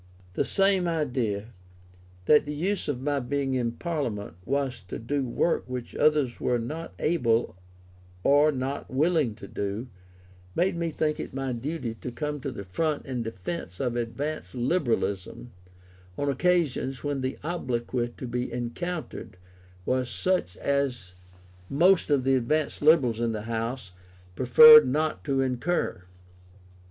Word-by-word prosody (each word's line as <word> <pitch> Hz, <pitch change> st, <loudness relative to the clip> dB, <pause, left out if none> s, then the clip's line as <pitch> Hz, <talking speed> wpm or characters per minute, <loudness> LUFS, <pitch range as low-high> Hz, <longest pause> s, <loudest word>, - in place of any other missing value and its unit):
The -, -, 0 dB
same 195 Hz, -2 st, +2 dB
idea, 125 Hz, -10 st, -1 dB, 0.8 s
that 150 Hz, +4 st, +5 dB
the 150 Hz, -, -3 dB
use 190 Hz, +7 st, -1 dB
of 130 Hz, -3 st, -3 dB
my 145 Hz, 0 st, +1 dB
being 135 Hz, +1 st, -1 dB
in 120 Hz, -2 st, 0 dB
Parliament 120 Hz, -, -3 dB
was 135 Hz, -2 st, -1 dB
to -, -, -5 dB
do 135 Hz, +4 st, -2 dB
work 165 Hz, +7 st, 0 dB
which 125 Hz, -1 st, -6 dB
others 150 Hz, -5 st, +2 dB
were 125 Hz, -, +1 dB
not 155 Hz, +8 st, -6 dB
able 120 Hz, -, +1 dB, 0.7 s
or 145 Hz, +2 st, +5 dB
not 135 Hz, +1 st, -4 dB
willing 150 Hz, -4 st, +1 dB
to 100 Hz, -, -10 dB
do, 100 Hz, +5 st, -4 dB, 0.7 s
made 180 Hz, +1 st, +2 dB
me 170 Hz, 0 st, -1 dB
think 150 Hz, -1 st, -1 dB
it -, -, -6 dB
my 135 Hz, -1 st, -2 dB
duty 125 Hz, 0 st, -4 dB
to 120 Hz, +2 st, -7 dB
come 150 Hz, +3 st, -3 dB
to 135 Hz, 0 st, -4 dB
the 100 Hz, -, -7 dB
front 150 Hz, -, -2 dB
in 130 Hz, -3 st, -3 dB
defence 110 Hz, -, -6 dB
of 125 Hz, -2 st, -1 dB
advanced 130 Hz, +6 st, -4 dB
Liberalism 120 Hz, -, -1 dB, 0.7 s
on 145 Hz, -, 0 dB
occasions 140 Hz, -3 st, 0 dB
when 145 Hz, -2 st, -2 dB
the 130 Hz, 0 st, -3 dB
obloquy 125 Hz, -7 st, -2 dB
to -, -, -6 dB
be 125 Hz, +1 st, -3 dB
encountered 125 Hz, -, -5 dB, 0.5 s
was 130 Hz, -1 st, 0 dB
such 180 Hz, -, 0 dB
as 130 Hz, -10 st, -1 dB, 0.6 s
most 175 Hz, +6 st, +4 dB
of 140 Hz, -3 st, +3 dB
the 135 Hz, +1 st, +2 dB
advanced 140 Hz, +4 st, 0 dB
Liberals 145 Hz, -7 st, +4 dB
in 115 Hz, -1 st, 0 dB
the 105 Hz, -1 st, -4 dB
House, 115 Hz, -2 st, -3 dB, 0.4 s
preferred 230 Hz, -, +9 dB
not 155 Hz, +4 st, -1 dB
to 135 Hz, -2 st, +1 dB
incur. 130 Hz, -, -1 dB
135 Hz, 145 wpm, -27 LUFS, 120-155 Hz, 0.8 s, preferred